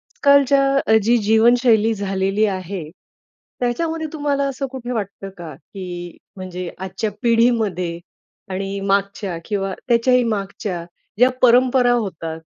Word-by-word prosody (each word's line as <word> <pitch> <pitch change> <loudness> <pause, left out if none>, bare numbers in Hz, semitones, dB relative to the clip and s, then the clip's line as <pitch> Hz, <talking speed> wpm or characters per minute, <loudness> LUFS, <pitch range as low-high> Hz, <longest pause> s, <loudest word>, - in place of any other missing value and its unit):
आज - - -33
कालच्या 275 -4 +4
जी 235 +2 +4
जीवनशैली 225 +1 +4
झालेली 195 0 0
आहे, 185 -2 -4 0.8
त्याच्यामध्ये 320 +6 -1
तुम्हाला 290 -2 0
असं 275 0 -3
कुठे 250 -2 -6
वाटतं 200 -3 -4
का, 165 -3 -8
की 175 +2 -8 0.2
म्हणजे 185 -2 -6
आजच्या 190 +3 -4
पिढीमध्ये 220 -8 +1 0.5
आणि 195 +1 -3
मागच्या 200 -2 -1
किंवा 195 -2 -2
त्याच्याही 250 +1 +3
मागच्या 195 -5 -3 0.3
ज्या 250 +3 +5
परंपरा 250 0 +5
होतात 170 -8 -3
215 Hz, 115 wpm, -20 LUFS, 190-245 Hz, 0.8 s, ज्या